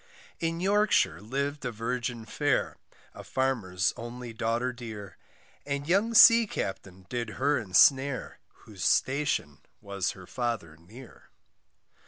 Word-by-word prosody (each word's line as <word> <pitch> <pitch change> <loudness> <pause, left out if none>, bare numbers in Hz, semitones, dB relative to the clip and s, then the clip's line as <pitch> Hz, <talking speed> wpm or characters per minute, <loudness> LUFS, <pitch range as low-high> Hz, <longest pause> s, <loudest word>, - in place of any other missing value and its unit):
In 165 0 -2
Yorkshire, 200 - +2
liv'd 140 +6 -3
a 125 - -2
virgin 120 +1 -4
fair, - - -1 0.4
A - - -10
farmer's 110 -9 -1
only 120 0 -8
daughter 115 +3 -1
dear, 110 -5 -9 0.5
And 140 0 -4
young 205 +6 +1
sea 230 0 +8
captain 95 - -6
did 120 +2 -3
her 145 +3 +2
ensnare, 130 +6 +3 0.3
Whose - - -9
station 130 - 0 0.2
was 100 -2 -3
her 95 - -11
father 115 -9 -4
near. 110 +11 -15
120 Hz, 120 wpm, -28 LUFS, 100-140 Hz, 0.5 s, sea